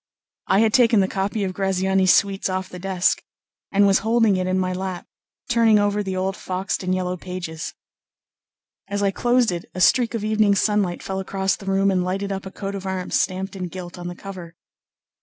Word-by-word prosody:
I 195 +2 +4
had 220 -1 +3
taken 235 -4 +5
the 190 - +3
copy 200 +2 -2
of 185 -1 -2
Graziani's 190 -1 +2
suites 195 -1 +2
off 185 0 -3
the 180 - -9
desk, 185 -1 +1 0.5
and 200 0 +4
was 195 -1 +4
holding 225 -2 +3
it 185 0 -1
on 185 0 +1
my 185 -1 0
lap 185 -1 -4 0.4
turning 230 -3 +4
over 205 0 +1
the 190 -2 -3
old 190 +1 -1
foxed 185 +1 -3
and 185 0 0
yellow 180 0 -2
pages. 175 -3 -6 1.1
As 200 +1 -2
I 200 - +2
closed 240 +1 +2
it 170 -1 -4
a - - -4
streak 235 +4 +3
of 220 - -3
evening 215 -1 +3
sunlight 200 -3 +1
fell 190 0 -3
across 190 0 -1
the 195 - -12
room 195 0 +2
and 185 -1 +1
lighted 195 +2 -2
up 195 0 -4
a - - -8
coat 195 0 -5
of 195 -1 -5
arms 185 -1 0
stamped 190 +1 -3
in 185 -2 -4
gilt 175 0 -8
on 175 - -6
the 175 - -6
cover. 180 -4 -9
190 Hz, 205 wpm, -22 LUFS, 185-200 Hz, 1.1 s, taken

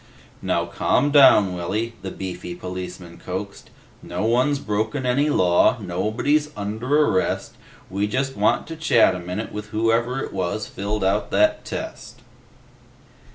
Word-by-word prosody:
"Now - - 0
calm 145 +3 +1
down, 130 -10 +6
Willy," 105 +7 -3
the 95 - -5
beefy 90 -2 -6
policeman 90 -1 -7
coaxed. 100 +2 -6 0.3
"No - - -4
one's 125 +5 +2
broken 110 +2 -2
any 140 +4 +2
law. 90 0 +3
Nobody's 110 +11 0
under 120 +9 +1
arrest. 95 - -1 0.3
We 100 +2 -1
just 135 +5 -2
want - - +2
to 165 - -7
chat 160 - +4
a 90 - -4
minute 90 +5 -5
with 105 0 -6
whoever 115 +4 0
it - - -7
was 95 +3 -2
filled 105 +1 -3
out 100 +2 +1
that 315 0 +2
test." - - -7
105 Hz, 140 wpm, -22 LUFS, 95-130 Hz, 0.3 s, down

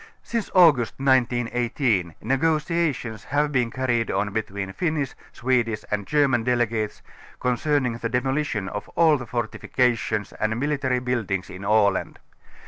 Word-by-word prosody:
Since 230 -2 -3
August 155 -10 +5
J 135 - -7
918 120 - +1
negotiations 150 - 0
have 145 +1 0
been 125 -4 +1
carried 120 -2 0
on 100 +2 0
between 100 -3 -3
Finnish. 155 - -1 0.2
Swedish 120 -3 0
and 105 -1 -2
Gerinan 140 -6 +2
delegates 115 -3 -1 0.4
concerning 125 -1 0
the 115 - -2
demolition 125 -4 -1
of 105 +1 -6
all 160 -3 +5
the 120 -3 -8
fortifications 120 -2 -1
and 110 +2 -1
military 140 -2 0
buildings 115 -7 -2
in 90 +2 -9
Aland. 100 -1 +2
120 Hz, 130 wpm, -24 LUFS, 110-135 Hz, 0.4 s, August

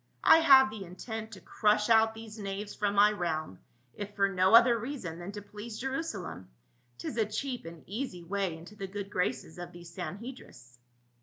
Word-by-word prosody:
I 325 - +8
have 265 -6 +7
the 215 -2 -6
intent 220 +5 -7
to 190 - -10
crush 210 +3 +2
out 225 -1 +5
these 220 -1 -9
knaves 200 +1 -5
from 205 -1 -1
my 205 +1 +6
realm, 160 - -3 0.3
if 205 0 -7
for 200 -1 +3
no 190 +2 +4
other 235 +1 +7
reason 215 - -5
than 175 +3 -6
to 205 -1 -7
please 215 +2 -8
Jerusalem; 240 - -4 0.5
'tis 120 - -5
a 220 - +3
cheap 245 +1 -4
and 165 -1 -10
easy 205 -4 -5
way 190 -2 -2
into 175 +6 -13
the 195 -2 -5
good 200 +1 -6
graces 180 -3 -2
of 175 - -7
these 170 -1 -12
Sanhe 205 +8 -5
drists." 125 - -16
205 Hz, 185 wpm, -30 LUFS, 180-225 Hz, 0.5 s, I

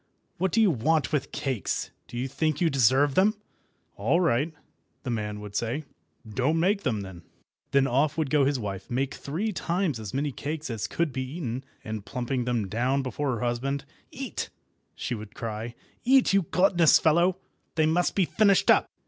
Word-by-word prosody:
What 190 0 +1
do 225 - +2
you 215 -4 +5
want 155 +3 +1
with 145 -1 0
cakes? 130 -7 -2 0.2
Do 120 - -8
you 125 +2 -1
think 150 +2 -1
you 170 -2 +2
deserve 135 +2 +4
them?" 200 +6 +4 0.6
"All 170 - +2
right," 160 -2 +2 0.5
the 130 - -3
man 105 -2 -3
would 105 -1 -9
say; 120 +8 -1 0.4
"don't 130 +9 +1
make 195 +4 +2
them, 110 - -1
then." 95 -3 -9 0.5
Then 140 -1 +4
off 140 +4 +1
would 155 -4 -1
go 150 -2 +4
his 140 0 +2
wife, 100 -4 -5
make 130 +2 -1
three 180 +10 -3
times 175 - -1
as 105 -3 -6
many 145 +4 -1
cakes 150 +1 -4
as 110 -2 -3
could 165 -5 -1
be 130 - -2
eaten, 130 -6 -3 0.2
and 110 -2 -5
plumping 125 +1 -2
them 120 -5 0
down 125 +7 0
before 130 +2 -2
her 115 - -5
husband— 130 +3 -1 0.2
"Eat," - - -5 0.5
she - - -3
would 110 -2 -7
cry—"eat, 120 - 0
you 195 -5 +3
gluttonous 180 -3 +5
fellow! 170 +3 +3 0.4
They 160 -1 +3
must 170 +3 +1
be 195 - +3
finished 200 0 +4
up." - - +4
140 Hz, 180 wpm, -27 LUFS, 120-165 Hz, 0.6 s, you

